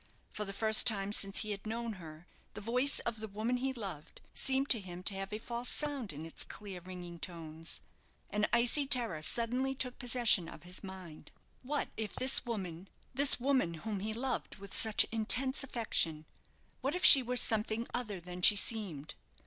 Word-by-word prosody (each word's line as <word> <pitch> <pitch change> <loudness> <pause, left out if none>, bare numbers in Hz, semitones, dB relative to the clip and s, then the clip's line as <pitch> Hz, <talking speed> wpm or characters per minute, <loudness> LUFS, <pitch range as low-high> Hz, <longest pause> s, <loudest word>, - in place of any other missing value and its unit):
For 210 - -5
the 195 - -4
first 220 +2 +5
time 200 -3 +4
since 195 -1 +3
he 215 - -4
had 200 +1 -6
known 230 +1 -4
her, 155 +1 -12 0.3
the - - -5
voice 250 +6 +2
of 235 -2 -3
the 220 - -4
woman 220 +5 -2
he 265 +2 -2
loved, 195 - -7
seemed 270 +1 +1
to 230 - +6
him 180 -2 -9
to 200 - +1
have 195 +1 -5
a 210 - -3
false 235 +2 -5
sound 285 -7 -3
in 150 +2 -8
its 165 - -2
clear, 200 -4 -8
ringing 175 -1 -9
tones. 165 -2 -7 0.5
An 210 0 0
icy 245 +4 +3
terror 235 - +2
suddenly 245 +8 0
took 250 -1 -3
possession 235 -8 +3
of - - -12
his 180 +3 -4
mind. 185 -6 -10 0.3
What 290 +3 -3
if 220 -2 -4
this 260 -1 +2
woman 190 -5 -5 0.3
this 275 +1 +3
woman, 255 -10 0
whom 210 -3 -3
he 215 +3 -4
loved 245 +3 -3
with 200 -1 -12
such 220 -2 +3
intense 250 +5 +2
affection 165 - +1 0.6
what 275 +5 -2
if 360 - +1
she 275 - +11
were 250 0 -2
something 220 0 -1
other 215 -6 -3
than 180 +1 -9
she 210 - +8
seemed! 195 -9 -3
215 Hz, 185 wpm, -33 LUFS, 185-245 Hz, 0.6 s, she